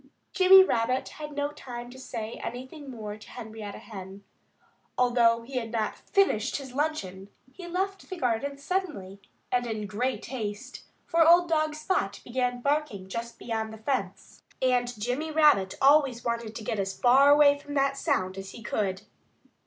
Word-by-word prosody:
Jimmy 380 0 +8
Rabbit 250 -5 0
had 300 -1 -8
no 290 0 -2
time 240 -3 -8
to 260 - -12
say 230 -3 -6
anything 260 +4 -7
more 215 -4 -6
to 215 - -15
Henrietta 220 -4 -8
Hen. 195 -2 -10 0.7
Although 235 -2 +3
he 255 +2 -6
had 230 -2 -3
not 220 -2 -1
finished 270 - +1
his 270 -3 -6
luncheon 205 -11 -3 0.2
he 360 -2 -9
left 385 +2 -3
the 375 - -5
garden 275 0 -1
suddenly 280 - -4 0.3
and 245 -1 +1
in 215 -2 -3
great 245 +6 -2
haste. 215 -5 -6 0.2
For 335 -2 +4
old 345 +1 +7
dog 310 -1 +1
Spot 310 - -1
began 245 0 -2
barking 280 -9 -1
just 230 +3 -5
beyond 220 -1 -3
the 220 - -9
fence; 255 +4 -4 0.2
and 245 -3 +1
Jimmy 250 +8 -2
Rabbit 300 -12 +4
always 270 -4 +4
wanted 235 -2 -2
to 225 - -6
get 210 0 -2
as 195 -1 -3
far 275 +4 +6 0.2
from 290 0 -8
that 275 0 +2
sound 195 - -1
as 195 0 -8
he 230 - -11
could. 195 -3 -2
245 Hz, 160 wpm, -27 LUFS, 220-290 Hz, 0.7 s, Jimmy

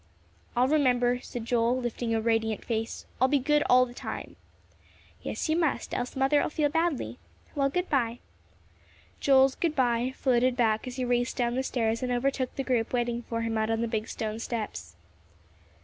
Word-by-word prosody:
"I'll 250 +1 +4
remember," 250 -4 +3
said 240 -3 -6
Joel, 235 +1 +2
lifting 240 -1 -3
a - - +2
radiant 225 -1 0
face; 225 -1 -3 0.2
"I'll 260 - +6
be 285 +2 +3
good 295 +3 +2
all 255 0 +6
the 240 - -11
time." - - -6 0.9
"Yes, - - -3
you 315 - +2
must, 325 -4 0
else 245 0 -3
Mother'll 270 +2 +2
feel 300 -1 +1
badly. 325 -1 -1 0.3
Well, 275 -2 +1
good 360 +6 -1
by." 240 -4 0 1.0
Joel's 270 -1 +5
good 325 0 -1
by 250 0 +1
floated 255 -1 +2
back 220 -1 +1
as 250 - -5
he 255 -1 -2
raced 245 0 0
down 240 -2 +1
the 260 - 0
stairs 230 -3 -1
and 250 -1 -1
overtook 255 +1 -1
the 270 - -2
group 245 -3 0
waiting 240 -1 0
for 230 0 -1
him 225 -1 -1
out 220 0 0
on 225 0 0
the 235 - 0
big 220 -1 -2
stone 220 0 -4
steps. 210 - -5
245 Hz, 180 wpm, -28 LUFS, 230-270 Hz, 1.0 s, I'll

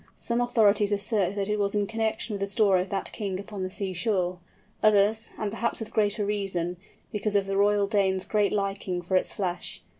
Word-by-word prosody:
Some 235 +1 -1
authorities 215 -4 +3
assert 200 -1 +1
that 200 -1 -1
it 210 0 0
was 200 0 0
in 205 -1 +2
connection 220 +1 -2
with 200 - -3
the 200 - 0
story 200 -3 +3
of 185 - -5
that 195 - -3
king 195 -4 -3
upon 200 0 -7
the 185 - -2
seashore; 185 -1 -1 0.4
others, 215 +1 +3
and 210 -2 -2
perhaps 230 +2 0
with 225 0 -7
greater 210 -1 +1
reason, 190 -4 -2 0.3
because 210 0 -1
of 200 -1 +3
the 195 0 -2
Royal 205 0 +3
Dane's 195 -2 +1
great 210 -2 +1
liking 195 -3 -2
for 185 +2 -1
its 185 - +2
flesh. 180 - -4
200 Hz, 200 wpm, -27 LUFS, 190-210 Hz, 0.4 s, authorities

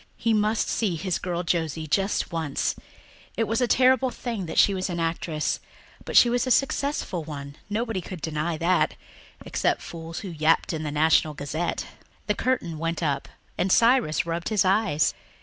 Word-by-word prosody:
He 230 - +1
must 215 +1 +1
see 200 -7 0
his 175 +3 -2
girl 175 -1 -2
Josie 160 -2 -1
just 195 +6 0
once; 160 -4 -1 0.6
it 230 - +2
was 225 +3 0
a 245 - +3
terrible 260 +1 +4
thing 230 -7 -4
that - - -5
she 200 - +6
was 185 0 -2
an 170 -1 -3
actress, 165 -2 -1 0.5
but - - +1
she - - +8
was 245 +2 +1
a - - 0
successful 275 - 0
one, 140 -2 -7
nobody 220 -2 -1
could 180 0 -8
deny 155 +1 -2
that, 175 +3 +2 0.5
except - - 0
fools 165 -1 -7
who 195 - -6
yapped 160 +1 +2
in 160 - -3
the 155 - -3
National 155 0 +3
Gazette. 155 +5 -3 0.4
The 210 - +1
curtain 200 -10 -1
went 165 +1 -2
up 145 -3 -1 0.3
and 185 - +1
Cyrus 230 -10 +4
rubbed 170 0 -3
his 215 -3 +2
eyes. 190 -5 +2
175 Hz, 175 wpm, -25 LUFS, 160-220 Hz, 0.6 s, she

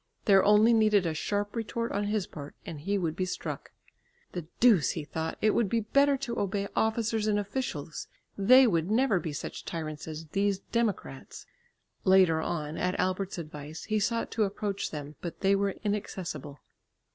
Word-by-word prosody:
There 195 -3 +6
only 210 +3 +6
needed 215 -4 +4
a 165 - 0
sharp 205 +7 -2
retort 230 +1 -2
on 205 +1 -1
his 210 -2 0
part, 145 -4 -9
and 155 - -6
he 200 +5 0
would 165 -4 -1
be 185 - -1
struck. 180 - -5 0.6
"The 175 -3 -6
deuce!" 220 -11 +5
he 160 - -4
thought, 160 +2 -4
"it 215 - +5
would 220 -3 +1
be 230 +2 +1
better 280 +6 +3
to 245 -3 -4
obey 200 0 -1
officers 220 -1 +1
and 210 -1 +2
officials; 200 - -4 0.3
they 255 +7 +7
would 170 -6 +1
never 220 -3 +3
be 160 - -4
such 145 - -6
tyrants 155 -2 -5
as 160 0 -6
these 200 +2 +1
democrats." 230 +1 -3 0.6
Later 185 -4 +5
on, 155 -2 -3
at 180 0 -1
Albert's 185 +1 -1
advice, 155 -1 -7
he 215 -1 0
sought 230 +3 -1
to 225 - +1
approach 200 0 -2
them, 150 -1 -7
but 170 - -6
they 195 0 +4
were 200 0 0
inaccessible. 180 -9 -4
195 Hz, 175 wpm, -29 LUFS, 165-215 Hz, 0.6 s, they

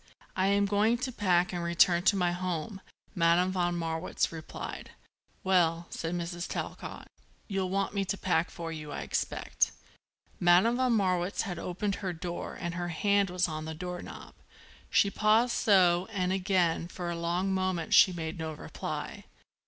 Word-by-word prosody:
"I 190 +1 +2
am 200 0 +3
going 210 +4 +2
to 255 +2 -3
pack 180 -5 +2
and 175 -1 -2
return 170 0 +4
to 205 - +5
my 180 -2 +1
home," 185 +2 -3 0.3
Madame 175 0 +3
von 175 -2 0
Marwitz 165 0 -1
replied. 160 -1 -7 0.5
"Well," 170 -3 +2
said 165 +1 -3
Mrs. 175 0 -4
Talcott, - - -6 0.4
"you'll 195 -3 -1
want 195 +1 -1
me 200 -1 0
to 200 +2 -2
pack 175 -3 +1
for 165 -1 -6
you, 155 -2 -7
I - - -4
expect." - - -1 0.7
Madame 180 +8 +5
von 255 -2 +2
Marwitz 185 -3 +1
had 180 -6 -5
opened 195 +4 -2
her 185 -3 -2
door 175 +1 -5
and 170 -1 -3
her 175 0 -3
hand 200 +4 +2
was 180 0 +1
on 155 -1 -5
the 160 0 -5
door 180 +1 -5
knob. - - -10 0.6
She 200 - +3
paused 220 +4 +3
so 180 -3 +4
and 185 -3 0
again, 180 -3 +1
for 175 0 -5
a - - -3
long 175 +3 -1
moment, 185 -3 -1
she 190 - +8
made 165 -1 -5
no 160 -1 -3
reply. 150 - -6
180 Hz, 170 wpm, -30 LUFS, 170-195 Hz, 0.7 s, she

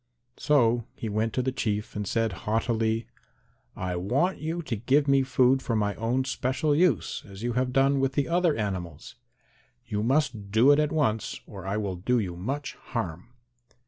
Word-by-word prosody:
So 120 -6 +2
he 115 - -5
went 110 +2 0
to 130 - 0
the 130 - 0
Chief 105 -5 -2
and 105 -1 -3
said 115 0 0 0.2
haughtily, 115 0 0 0.7
"I 90 -1 -3
want 125 - 0
you 165 +3 -3
to 130 -6 -3
give 135 +7 +2
me 140 0 +4
food 130 0 +3
for 115 - -2
my 105 -1 +1
own 120 +5 -1
special 135 +3 0
use 150 - +1
as 100 +2 -10
you 120 0 -1
have 125 +1 0
done 135 +1 +3
with 135 0 +1
the 145 - 0
other 170 -2 +2
animals. 90 -8 -4 0.7
You 105 0 -2
must 120 -4 0
do 115 +7 +5
it 145 - +5
at 150 -1 +1
once 125 -9 0
or - - -9
I 100 +2 -1
will 100 -4 -2
do 125 +8 +1
you 95 -6 -2
much 135 +11 -4
harm." 90 -5 -5
120 Hz, 180 wpm, -27 LUFS, 105-135 Hz, 0.7 s, do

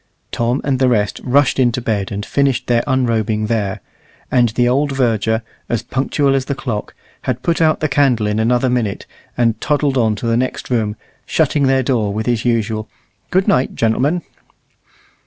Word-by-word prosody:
Tom 120 +3 0
and 135 -2 0
the 130 -1 +3
rest 105 -4 0
rushed 135 +1 +2
into 125 -1 +2
bed 110 -5 -2
and 100 +1 -4
finished 135 -2 0
their 120 -1 +2
unrobing 115 -5 +1
there, 105 -3 -2 0.5
and 120 -2 +4
the 120 +2 +1
old 140 +3 +1
verger, 110 -4 0 0.3
as 120 - -1
punctual 140 +1 0
as 135 -1 0
the 140 - -2
clock, 115 -6 -4 0.3
had 125 -1 -2
put 170 -1 0
out 155 -1 +3
the 155 - +2
candle 135 -6 +2
in 105 +1 0
another 120 +3 +2
minute, 120 -5 -1 0.3
and 115 -2 +1
toddled 145 -3 +1
on 110 -2 +2
to 105 - -6
the 115 0 +2
next 130 +1 -3
room, 110 -4 0 0.3
shutting 140 -3 +2
their 130 0 +3
door 115 -6 0
with 110 +2 -3
his 120 -2 0
usual 110 -2 0 0.4
"Good 190 +1 +1
night, 125 +1 +2
gen'lm'n." 135 +10 +1
120 Hz, 175 wpm, -18 LUFS, 110-135 Hz, 0.5 s, and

